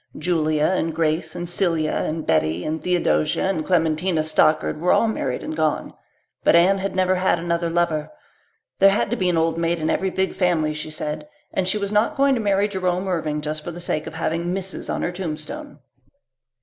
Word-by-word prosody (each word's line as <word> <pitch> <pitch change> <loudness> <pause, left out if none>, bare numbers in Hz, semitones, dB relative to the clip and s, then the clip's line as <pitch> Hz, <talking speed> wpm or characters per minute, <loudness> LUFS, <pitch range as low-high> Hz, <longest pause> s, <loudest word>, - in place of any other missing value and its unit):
Julia 155 -2 +1
and 165 -1 +1
Grace 160 0 0
and 175 - -4
Celia 165 -3 +1
and 155 0 -2
Betty 80 +2 +1
and 155 +1 -2
Theodosia 125 - +1
and 180 -5 -1
Clementina 165 0 +1
Stockard 155 0 +2
were 180 - +3
all 230 - +4
married 135 - -2
and 155 - -4
gone. 155 -1 -1 0.5
But - - +5
Anne 185 +3 +5
had 195 0 -3
never 185 0 +2
had 185 -1 +2
another 170 0 -1
lover. 165 -3 0 0.7
There 195 - +7
had 200 +1 0
to - - +2
be 185 -5 +1
an 175 - +1
old 165 0 +1
maid 170 +1 +1
in 160 -1 -1
every 190 - 0
big 190 +1 -1
family 165 -5 +1
she 150 +1 -6
said, 150 -1 -5 0.2
and 190 -1 0
she 190 - +2
was 200 -1 -3
not 210 +2 +1
going 275 0 +4
to 245 - 0
marry 200 -1 +2
Jerome 185 -1 -1
Irving 155 -4 -1
just 155 0 -4
for - - -5
the 175 0 -7
sake 155 -3 -2
of 160 - -7
having 165 +1 -1
Mrs. 190 +1 -3
on - - -2
her 175 - -1
tombstone. 190 - -6
170 Hz, 200 wpm, -22 LUFS, 155-190 Hz, 0.7 s, There